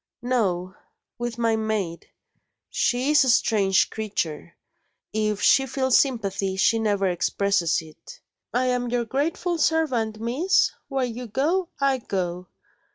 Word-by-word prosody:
"No 190 -8 0 0.5
with 240 -1 -4
my 230 -1 +1
maid. 215 -6 -3 0.6
She 255 +4 +1
is 300 -1 +6
a 260 - +1
strange 200 -5 +3
creature; 175 -7 -4 0.6
if 215 -1 -1
she 270 0 +5
feels 260 0 +2
sympathy, 200 -7 -1
she 210 +4 +3
never 205 -3 +1
expresses 180 -1 +1
it. 155 -1 -14 0.3
'I 255 +1 +1
am 250 -1 0
your 240 0 0
grateful 325 +7 -1
servant, 260 -10 +1
Miss. 275 - +2 0.2
Where 270 -2 -1
you 245 0 -6
go, 325 - 0
I 275 -2 +2
go.' 180 -4 -3
230 Hz, 130 wpm, -24 LUFS, 195-260 Hz, 0.6 s, is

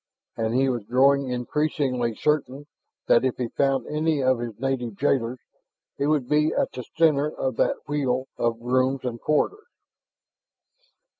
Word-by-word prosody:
And 115 +1 -1
he 135 +1 +3
was 120 -4 -1
growing 135 +3 +3
increasingly 125 -2 -1
certain 145 -1 -1 0.4
that 120 - +4
if 130 -1 0
he 125 -2 -2
found 135 -1 0
any 155 0 0
of 130 -1 +2
his 115 -3 -6
native 125 -4 -2
jailers, 125 -1 0 0.6
it 140 - +1
would 150 -5 +1
be 150 +2 +2
at - - 0
the 125 - -6
center 150 -3 +3
of 130 -3 -3
that - - 0
wheel 135 -3 -1
of 115 -1 -1
rooms 130 +2 +1
and 120 -2 -4
corridors. 410 - 0
130 Hz, 150 wpm, -25 LUFS, 125-145 Hz, 0.6 s, that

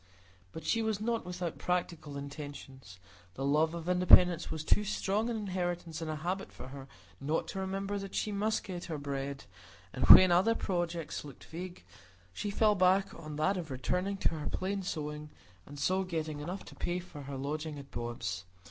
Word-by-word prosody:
But 160 - -8
she 230 - +2
was 220 -2 0
not 230 -3 -1
without 180 -2 -4
practical 170 -5 -2
intentions; 140 - -8 0.4
the 135 - -2
love 155 +4 +3
of 170 0 -6
independence 180 -1 +6
was 160 -1 -3
too 210 - +3
strong 210 +2 0
an 235 - -1
inheritance 175 -5 -3
and 160 - -3
a 155 - -1
habit 180 +5 -3
for 130 - -9
her 135 0 -9 0.3
not 150 +4 -1
to 195 - -4
remember 195 +1 -2
that 195 0 -7
she 210 - 0
must 210 +2 0
get 180 -2 -6
her 160 - -4
bread; 140 -1 -4 0.5
and - - 0
when 185 -1 +11
other 190 +7 +4
projects 175 -5 -2
looked 145 -3 -11
vague, 175 - -7 0.5
she 205 - -3
fell 210 +1 +4
back 190 0 +3
on 155 -2 -8
that 170 +6 +2
of 170 -3 -4
returning 180 +9 -1
to - - +2
her 155 -2 -4
plain 195 +1 -2
sewing, 150 -3 -4 0.4
and 145 - -9
so 185 +7 +1
getting 160 -4 -3
enough 175 +6 -5
to - - -11
pay 175 0 -1
for 175 -5 -8
her 140 0 -6
lodging 150 +2 -3
at 140 -1 -10
Bob's. 120 -6 -4
170 Hz, 185 wpm, -32 LUFS, 150-190 Hz, 0.5 s, when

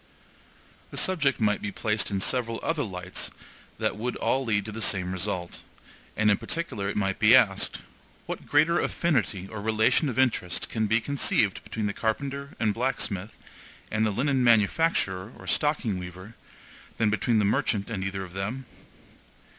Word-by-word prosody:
The - - -8
subject 145 -9 +2
might 105 -2 +2
be 100 - -3
placed 105 0 0
in 100 -1 -1
several 115 0 0
other 165 -2 0
lights 95 -5 -4 0.5
that - - -1
would 125 +3 -3
all 135 +1 0
lead 105 -5 0
to 110 - -5
the 110 +2 -6
same 95 -3 +2
result; 90 -1 -3 0.6
and 110 0 +4
in 100 - +3
particular 110 -13 -3
it 105 - -3
might 95 -2 0
be - - +7
asked, - - +3 0.4
What - - -6
greater 155 +4 +4
affinity 110 - 0
or 105 0 -7
relation 110 +7 +2
of 125 - -5
interest 120 -9 +1
can 110 -2 0
be 115 +2 +2
conceived 115 -6 +1
between 110 -2 -4
the 100 - -1
carpenter 140 +6 -3
and 105 -2 +2
blacksmith, 110 -4 -2 0.5
and 110 0 +1
the 110 - +3
linen 130 +5 +1
manufacturer 110 - +2
or - - -12
stocking 145 -10 0
weaver, 90 +4 -9 0.6
than 110 -2 +2
between 110 +2 +1
the 105 - +3
merchant 100 +1 0
and 95 -4 -2
either 95 0 -3
of 90 -2 -10
them? 110 +8 -4
110 Hz, 165 wpm, -27 LUFS, 100-130 Hz, 0.6 s, be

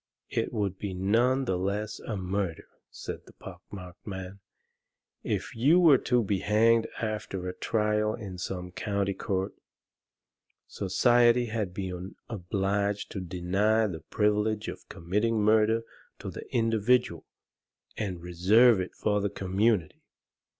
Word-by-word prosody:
"It - - -1
would 100 -3 -2
be 100 -3 -4
none 120 +8 +2
the 95 -6 0
less 100 +3 -2
a 110 - -5
murder," 95 -2 -3 0.2
said - - -8
the - - -15
pock - - -11
marked 90 -1 -10
man, 95 0 -6 0.8
"if - - -3
you 145 +10 +5
were 155 -7 +7
to 125 -1 +2
be 100 -1 0
hanged 115 +3 +3
after 105 -4 -3
a 90 - -3
trial 105 +1 0
in 95 -5 -8
some 90 -1 -5
county 100 0 -1
court. 95 -2 -2 1.1
Society 120 +5 +3
had 105 -5 -1
been 95 0 -6
obliged 100 0 -1
to 100 - -4
deny 95 +5 +1
the 90 -6 -4
privilege 105 0 0
of - - -8
committing 105 +7 0
murder 110 +2 +3 0.3
to - - -6
the - - -10
individual 115 -5 +1 0.7
and 95 -5 -4
reserve 100 +7 +5
it 95 - -6
for 105 -1 0
the 100 - 0
community. 95 -1 0
105 Hz, 135 wpm, -28 LUFS, 95-110 Hz, 1.1 s, were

